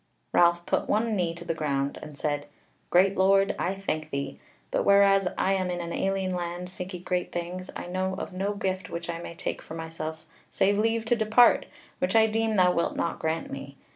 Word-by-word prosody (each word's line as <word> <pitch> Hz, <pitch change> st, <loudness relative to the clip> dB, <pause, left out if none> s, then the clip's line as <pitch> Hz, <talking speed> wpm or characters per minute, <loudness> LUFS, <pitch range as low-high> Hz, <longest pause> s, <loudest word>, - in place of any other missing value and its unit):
Ralph 175 Hz, 0 st, +4 dB
put -, -, 0 dB
one 220 Hz, +1 st, +1 dB
knee 170 Hz, -3 st, 0 dB
to 170 Hz, -, -9 dB
the 165 Hz, -, -1 dB
ground, 140 Hz, -3 st, -1 dB
and 150 Hz, -2 st, -10 dB
said: 145 Hz, -1 st, -2 dB, 0.4 s
"Great 190 Hz, +2 st, +4 dB
Lord, 195 Hz, +1 st, +4 dB
I 185 Hz, +2 st, 0 dB
thank 155 Hz, -6 st, -3 dB
thee: 140 Hz, -1 st, -4 dB, 0.3 s
but -, -, +1 dB
whereas 200 Hz, -1 st, +5 dB
I 195 Hz, -, +2 dB
am 185 Hz, -1 st, 0 dB
in 175 Hz, 0 st, -2 dB
an 170 Hz, -1 st, -4 dB
alien 195 Hz, -1 st, 0 dB
land 175 Hz, -1 st, -3 dB
and 180 Hz, -, -7 dB
seeking 180 Hz, -1 st, -7 dB
great 180 Hz, -1 st, -1 dB
things, 175 Hz, +2 st, -5 dB
I -, -, -5 dB
know 185 Hz, +1 st, -2 dB
of -, -, -5 dB
no 195 Hz, +3 st, -1 dB
gift 190 Hz, -2 st, -2 dB
which 170 Hz, 0 st, -4 dB
I 165 Hz, -, -5 dB
may 170 Hz, 0 st, -8 dB
take 185 Hz, -, -4 dB
for 160 Hz, -, -9 dB
myself 160 Hz, -1 st, -6 dB, 0.2 s
save 200 Hz, +1 st, +2 dB
leave 225 Hz, +1 st, +1 dB
to 240 Hz, -, +3 dB
depart, 225 Hz, +2 st, +5 dB, 0.3 s
which 270 Hz, -3 st, 0 dB
I 220 Hz, 0 st, +7 dB
deem 220 Hz, 0 st, 0 dB
thou 180 Hz, -2 st, +5 dB
wilt 170 Hz, -1 st, 0 dB
not 170 Hz, -, -2 dB
grant 160 Hz, +1 st, -2 dB
me. 140 Hz, 0 st, -7 dB
180 Hz, 210 wpm, -27 LUFS, 170-195 Hz, 0.4 s, I